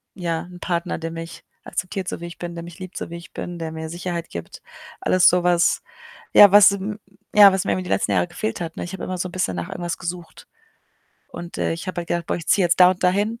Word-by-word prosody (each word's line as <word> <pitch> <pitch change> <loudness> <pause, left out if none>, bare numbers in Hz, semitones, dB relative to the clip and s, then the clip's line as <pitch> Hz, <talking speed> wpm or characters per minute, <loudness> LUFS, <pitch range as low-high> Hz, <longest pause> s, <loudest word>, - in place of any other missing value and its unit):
ja, 170 -3 -2
'n 180 0 -12
Partner, 175 -1 -2
der 165 0 -5
mich 165 0 -8 0.2
akzeptiert, 185 0 -4
so - - -5
wie - - -5
ich 170 - -10
bin, 175 -1 -5
der 170 - -6
mich 170 +2 -12
liebt, 185 -1 -8
so - - -5
wie 170 - -7
ich 170 - -13
bin, 175 0 -6
der 165 -1 -4
mir 160 0 -6
Sicherheit 175 0 -4
gibt. 85 -1 -8 0.4
Alles 185 -1 +4
so 180 0 +1
was, 175 -1 +3 0.5
ja, 205 -2 +9
was, 205 0 +8
m 200 +2 -4 0.4
ja, 205 -1 +9
was 190 - 0
mir 100 - +1
eben 95 -1 -2
die 90 - -8
letzten 95 +1 +1
Jahre 90 -2 +2
gefehlt 110 - -4
hat, 165 -1 -5
ne? - - -3
Ich 175 - -8
habe 190 - -6
immer 185 - -4
so 180 +1 -3
'n - - -14
bisschen 180 - -1
nach 90 - -4
irgendwas 175 -1 -4
gesucht. 175 -1 -7 0.8
Und, 175 0 -8
äh, - - 0
ich 165 +3 -6
habe 185 -1 -3
halt 170 - -14
gedacht: 170 -1 -2
„Boah, - - -1
ich 170 - -8
ziehe 195 - +4
jetzt 170 - +1
da 180 0 +9
und 185 - -4
da 180 - +6
hin. 210 +5 -1
175 Hz, 270 wpm, -22 LUFS, 165-185 Hz, 0.8 s, ja